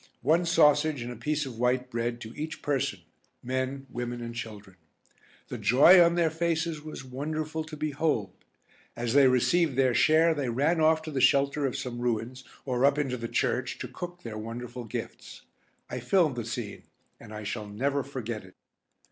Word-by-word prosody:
One 165 +6 +3
sausage 150 -4 +4
and 120 - -5
a - - -7
piece 150 +6 -1
of 120 -4 -8
white 125 +1 +1
bread 120 +1 -2
to 110 0 -8
each 155 +1 -6
person, 140 -3 -1 0.4
men, 130 +2 -2
women, 120 -1 -5
and 120 0 -6
children. 105 -5 -8 0.7
The - - -5
joy 170 +9 +7
on 170 0 +3
their 170 -2 +2
faces 165 -1 -1
was 155 -2 -8
wonderful 155 +4 -3
to 155 -1 -9
behold. 145 - -1 0.6
As 120 -1 -2
they 140 -1 +7
received 135 +4 +2
their 130 -1 +3
share 160 +5 +4
they 140 -5 -2
ran 150 +8 +1
off 160 0 +4
to 160 - -6
the 135 -3 -1
shelter 140 +2 +3
of 135 - -3
some 125 -3 -5
ruins, 120 +2 -2 0.2
or 125 -1 0
up 140 +1 +4
into 135 -4 -1
the 115 -1 -5
church, - - -1
to - - -5
cook 175 0 -8
their 110 -2 -6
wonderful 120 +2 -6
gifts. 105 - -7 0.4
I 125 - -5
filmed 155 +3 +2
the 120 -2 -4
scene, 115 -3 -6 0.3
and 115 - -12
I 105 0 -7
shall 105 +1 -4
never 135 +7 -1
forget 120 -6 -5
it. 95 0 -16
130 Hz, 180 wpm, -28 LUFS, 120-155 Hz, 0.7 s, joy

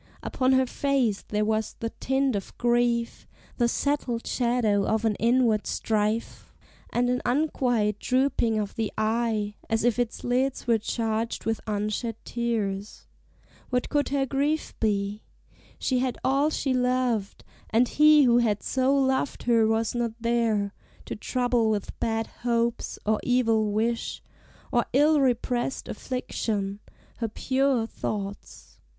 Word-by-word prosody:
Upon 260 0 +1
her 260 0 +4
face 255 -6 0
there 210 0 0
was 220 0 -1
the 230 0 -3
tint 265 -2 +1
of 200 - -6
grief, 240 -1 +1 0.3
The 240 - +3
settled 250 -2 -1
shadow 235 -5 +1
of 220 +2 0
an 220 - +3
inward 235 -2 +2
strife, 215 +1 -2 0.4
And 245 +1 +1
an 250 0 0
unquiet 245 -6 +1
drooping 255 -4 +1
of 205 -2 -2
the 220 -2 -2
eye, 220 -1 0 0.2
As 225 0 +1
if 240 0 +2
its 240 -2 -2
lids 255 +2 0
were 230 -2 +3
charged 225 +1 -2
with 225 0 -1
unshed 215 +2 -2
tears. 215 -4 -3 0.6
What 250 -1 -1
could 290 -1 +1
her 275 -1 +1
grief 285 +4 -1
be? 205 -1 0 0.6
she 255 -2 0
had 255 -1 -1
all 275 +3 +2
she 275 -3 -1
loved, 250 -5 0 0.3
And 235 +2 +3
he 300 +1 +6
who 240 -2 +5
had 215 -4 +1
so 265 +1 +2
loved 265 0 0
her 230 -2 +3
was 225 0 +1
not 240 -2 -1
there 225 -4 +1 0.3
To - - -5
trouble 245 0 0
with 210 -2 -3
bad 225 0 0 0.2
hopes, 235 -1 0
or 215 0 +2
evil 225 -4 +2
wish, 230 +3 -1 0.5
Or 240 -1 +2
ill 295 +2 +4
repressed 250 0 0
affliction, 210 -5 -3 0.4
her 230 - -1
pure 260 +1 +1
thoughts. 205 -3 -6
235 Hz, 140 wpm, -26 LUFS, 220-255 Hz, 0.6 s, he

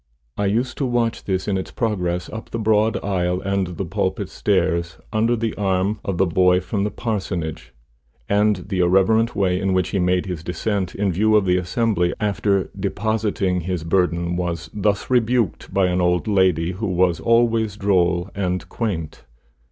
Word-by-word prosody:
I 100 - 0
used 120 +6 -1
to 140 - +1
watch 120 -2 -1
this 95 -1 -1
in 95 -2 0
its 95 - -6
progress 90 -6 -2
up 110 - -8
the - - -4
broad 110 -1 +2
aisle 90 -2 0
and 95 -3 -2
the - - -2
pulpit - - -2
stairs, 85 -1 0 0.2
under 115 +2 +2
the 115 -1 -2
arm 95 +1 0
of 95 -3 -2
the 95 - +3
boy 90 +1 +3
from 100 +3 -2
the 105 - 0
parsonage, 85 - -4 0.6
and 105 +1 +3
the 95 -3 -1
irreverent 95 +6 +3
way 90 -2 +1
in 95 -1 +1
which 95 -2 +1
he 100 - -1
made 90 0 +1
his 90 -4 -5
descent, 90 +2 -2
in 100 -1 0
view 110 +5 +2
of 105 -2 +4
the 90 0 +3
assembly, 90 0 0
after 100 -2 0
depositing 105 -4 -1
his 90 -1 -3
burden, 85 0 0
was 85 -2 -3
thus 100 0 0
rebuked 120 -4 +1
by 95 -1 +2
an 90 0 +1
old 90 +3 +1
lady 95 -4 +2
who 100 +4 -4
was 90 -2 +2
always 115 0 +2
droll 90 -2 +1
and 90 -2 -2
quaint. 90 - -4
95 Hz, 175 wpm, -21 LUFS, 90-105 Hz, 0.6 s, of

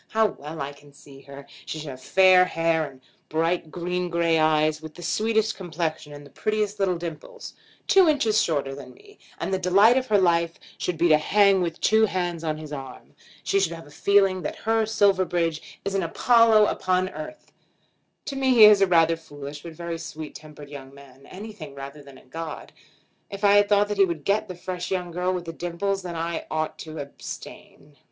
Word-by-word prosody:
How 220 0 +2
well 155 0 -9
I 140 +1 -4
can 145 0 -19
see 140 -1 -15
her! 140 0 -12 0.2
She - - -4
should 155 -1 -7
have 130 0 -11
fair 185 +4 +5
hair, 165 -3 0
and 130 -1 -18 0.3
bright 165 +1 -1
green 180 +2 -3
gray 170 -1 +1
eyes, 155 0 +2
with 155 -1 -10
the 175 - -10
sweetest 220 +5 0
complexion, 160 -4 -4
and 145 0 -11
the 140 - -16
prettiest 215 +2 -2
little 185 -3 +1
dimples; 165 -3 -8 0.3
two 380 -4 +5
inches 230 -8 +2
shorter 140 -4 -1
than 140 - -11
me, 415 +1 -19 0.2
and 195 - -3
the 190 - 0
delight 200 +7 +5
of 255 - -7
her 210 - +3
life 170 -3 +1 0.2
should 180 -2 -2
be 170 +2 +3
to 155 -1 +5
hang 200 +3 +3
with 170 -2 -3
two 220 0 +4
hands 175 -3 -3
on 155 -1 -2
his 155 -1 -9
arm. 135 -2 -9 0.3
She 195 - +1
should 180 -4 0
have 165 -1 -10
a 145 - -16
feeling 195 +2 +2
that 150 - -4
her 225 -1 +2
Silverbridge 185 -6 0
is 200 - -2
an 195 - +1
Apollo 220 +4 +4
upon 185 -2 0
earth. 310 +4 -10 0.7
To 280 - -5
me 265 -1 +2
he 225 - +8
is 210 -1 +7
a 195 - +5
rather 165 -2 +4
foolish, 145 -2 -10
but 170 0 -9
very, 170 +2 -8
very 165 - -3
sweet 160 -2 -8
tempered 150 -2 -12
young 135 -1 -10
man; 140 -1 -16
anything 185 -8 -10
rather 140 +2 -9
than 140 -2 -15
a - - -19
god. 160 +4 -8 0.6
If 200 +1 -8
I 205 0 +6
thought 205 0 +2
that 210 - -3
he 195 - +6
would 170 -5 -5
get 200 +2 +1
the 185 - -7
fresh 180 0 -5
young 180 -2 -3
girl 180 +2 -1
with 180 -2 -4
the 165 - -6
dimples 175 +4 -3
then 175 -2 -6
I 165 +1 -4
ought 155 0 -3
to 160 0 -8
abstain." 145 0 -10
170 Hz, 205 wpm, -24 LUFS, 155-200 Hz, 0.7 s, he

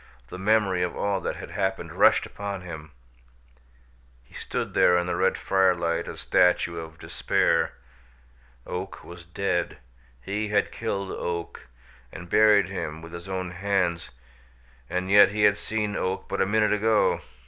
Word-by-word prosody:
the 90 - -8
memory 100 -2 +2
of 90 -1 -2
all 100 -2 -1
that - - -3
had - - -9
happened 95 -1 -2
rushed - - +4
upon 100 -2 -6
him. 80 -4 -9 1.3
He - - -25
stood - - -4
there 90 - +5
in 90 - 0
the 90 - -2
red - - +1
firelight 90 -3 +1
a - - -7
statue 85 -1 +2
of 80 0 -9
despair. - - 0 0.9
Oak 95 +2 -6
was 85 0 -11
dead; 85 0 -2 0.4
he 105 - -3
had 105 -1 +1
killed 100 -4 -3
Oak, 85 -1 -5 0.4
and 90 -2 -10
buried 105 -3 +5
him 80 -5 -5
with 85 +1 -11
his 85 +2 -8
own 95 -1 -3
hands, 90 -2 -1 0.8
and 90 +1 -2
yet 100 -1 +8
he 105 0 0
had 105 -1 +5
seen 105 -1 -3
Oak 95 +1 -2
but - - -2
a 95 - +2
minute 105 +1 +2
ago! 110 +1 +2
95 Hz, 155 wpm, -25 LUFS, 85-100 Hz, 1.3 s, yet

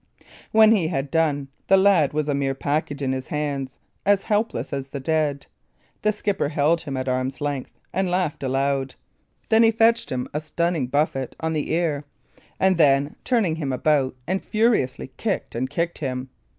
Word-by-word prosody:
When 220 0 +7
he 195 -8 +3
had 135 -4 -2
done, 145 -4 +1 0.2
the 195 - +6
lad 190 -7 +4
was 150 0 -1
a 145 - +1
mere 135 -1 0
package 145 0 -2
in 130 - 0
his 130 0 -3
hands 140 -3 -3 0.3
as 200 -1 +3
helpless 210 -6 -1
as 135 -1 -4
the 140 - -5
dead. 150 -1 0 0.6
The 215 - +3
skipper 205 -7 -1
held 160 +2 +2
him 140 -4 -5
at 130 0 -3
arm's 130 +1 -1
length, 145 -3 -3 0.2
and 190 0 0
laughed 175 -4 -1
aloud. 135 0 0 0.5
Then 220 0 +5
he 225 - +6
fetched 230 +1 +3
him 125 -1 -2
a 150 - -1
stunning 160 -2 -1
buffet 135 -2 -1
on 160 0 -1
the 150 -2 -2
ear; 160 -4 0 0.6
and 190 -1 +3
then 140 -1 +3
turned 200 -11 +1
him 140 -4 -2
about, 135 0 +1
and 190 +1 -1
furiously 215 - +1
kicked - - -2
and 130 +3 -2
kicked 170 +4 -2
him. 130 -3 -4
150 Hz, 175 wpm, -23 LUFS, 135-180 Hz, 0.6 s, When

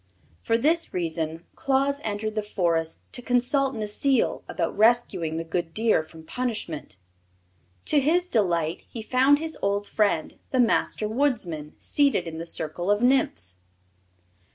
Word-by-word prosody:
For 230 - +2
this 325 - +1
reason 165 -1 -2
Claus 275 +1 +1
entered 215 0 -2
the 215 - -1
Forest 170 -6 -1
to 245 - -3
consult 255 +2 +1
Necile 225 +4 +1
about 165 -2 -2
rescuing 215 -8 +2
the 165 - -2
good 165 0 -3
deer 220 -6 +3
from 160 0 -13
punishment. 170 - -4 0.9
To 295 - +4
his 340 +6 +2
delight 170 - +1
he 225 - -7
found 260 +5 +4
his 320 +1 -4
old 200 +1 0
friend, 200 -7 0
the 260 - 0
Master 225 -2 +2
Woodsman, 210 - -1
seated 280 - +1
in 160 -1 -6
the 165 - -5
circle 165 +3 -2
of 205 +3 +2
Nymphs. 90 - +2
210 Hz, 140 wpm, -25 LUFS, 165-255 Hz, 0.9 s, To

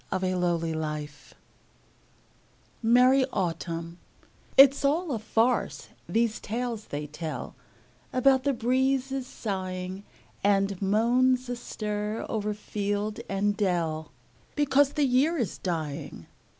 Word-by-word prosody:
Paul 185 -1 -1
Laurence 175 -1 +2 0.2
Dunbar 150 -1 -3 1.7
Merry 250 +3 +5
Autumn 170 -2 -3 0.6
IT'S 275 +1 +8
all 310 +4 +1
a 235 - -1
farce, 225 +3 0 0.2
these 225 -1 +1
tales 230 -1 -3
they 145 +1 -5
tell 150 -2 -6 0.6
About 260 +1 +4
the 285 - +2
breezes 265 +2 0
sighing, 185 -3 -4 0.4
And 195 -1 +2
moans 245 +5 +2
astir 210 -3 -3
o'er 210 -1 -2
field 205 0 -3
and 200 +1 +1
dell, 165 -6 -1 0.4
Because 285 -1 +3
the 295 -2 +2
year 275 +6 +2
is 235 -8 -2
dying. 160 -6 -4
210 Hz, 105 wpm, -27 LUFS, 185-255 Hz, 1.7 s, IT'S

